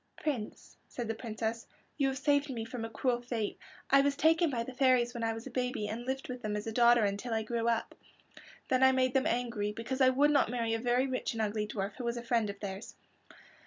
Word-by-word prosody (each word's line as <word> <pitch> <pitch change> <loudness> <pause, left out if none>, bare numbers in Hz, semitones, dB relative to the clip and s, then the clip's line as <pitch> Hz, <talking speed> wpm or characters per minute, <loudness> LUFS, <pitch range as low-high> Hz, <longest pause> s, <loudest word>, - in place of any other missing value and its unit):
"Prince," 255 -9 -4
said 240 -2 -5
the 225 - -1
Princess, 225 0 -4 0.3
"you 280 -2 +1
have 265 0 -1
saved 285 +2 +2
me 230 -4 -4
from 230 0 -6
a 225 - -4
cruel 240 +2 0
fate. 235 -4 -3 0.3
I 275 0 +7
was 280 0 +1
taken 325 +3 +3
by 240 -4 -1
the 260 - -8
fairies 250 -2 +3
when 235 -2 -4
I 225 - +1
was 225 +1 -6
a - - -7
baby 250 -4 -2
and 230 +4 -5
lived 265 +1 -3
with 250 -1 -6
them 210 -2 -2
as 210 - -4
a 225 - -3
daughter 235 0 +5
until 205 +4 -2
I 220 - 0
grew 230 +1 -2
up. 230 -1 0 0.8
Then 255 0 +2
I 265 0 +6
made 255 -1 +2
them 265 +3 +2
angry 235 -6 -1
because 240 +5 -4
I 260 - +7
would 285 +3 +3
not 285 -6 +3
marry 230 -2 -1
a 225 - 0
very 245 +2 +2
rich 260 -2 -2
and 225 - -2
ugly 210 0 -1
dwarf 200 -1 -4
who 255 - -5
was 235 0 -1
a 235 - -5
friend 230 -3 +1
of 200 0 -7
theirs. 195 +1 -6
240 Hz, 245 wpm, -31 LUFS, 225-260 Hz, 0.8 s, I